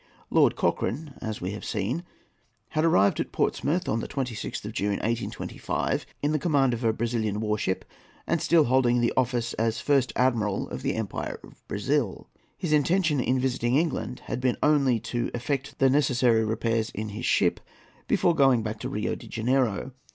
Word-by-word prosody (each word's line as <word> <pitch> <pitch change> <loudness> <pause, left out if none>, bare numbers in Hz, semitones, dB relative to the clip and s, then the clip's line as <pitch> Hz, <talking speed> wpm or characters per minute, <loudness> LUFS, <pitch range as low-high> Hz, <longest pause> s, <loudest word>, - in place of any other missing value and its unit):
Lord - - +4
Cochrane, 145 +3 -1
as 110 -1 -4
we 90 +2 -2
have 105 - -7
seen, 110 - -2 0.7
had 155 - 0
arrived 100 -12 +4
at - - -2
Portsmouth 170 +6 0
on 110 - +1
the - - -4
26th 125 -6 -4
of 105 - -5
June, 100 -2 0
1825, 115 +3 -2 0.2
in 150 +1 +1
command 140 -5 +2
of 120 +1 -4
a 115 - +4
Brazilian 110 -2 -1
war 105 -1 0
ship 95 -3 -2 0.4
and - - 0
still 165 -2 +5
holding 120 -2 +3
office 120 -2 0
as 115 0 +1
First 140 -3 +2
Admiral 115 -6 +1
of - - -5
the - - -1
Empire - - -4
of - - -16
Brazil. 120 +1 -1 0.3
His 165 -4 -1
intention 155 0 +2
in 130 +1 +1
visiting 125 -1 0
England 140 -5 -1
had 125 - -3
been 125 -1 +1
only 140 -6 +3
to 120 -1 -2
effect 135 +3 -3
the 135 - +4
necessary 125 -4 +3
repairs 115 0 0
in 110 +1 -3
his 105 - -4
ship - - +2 0.5
before 175 - +3
going 135 -7 +4
back 110 0 -4
to - - -4
Rio - - -2
de - - -8
Janeiro. 125 0 0
120 Hz, 175 wpm, -26 LUFS, 110-140 Hz, 0.7 s, still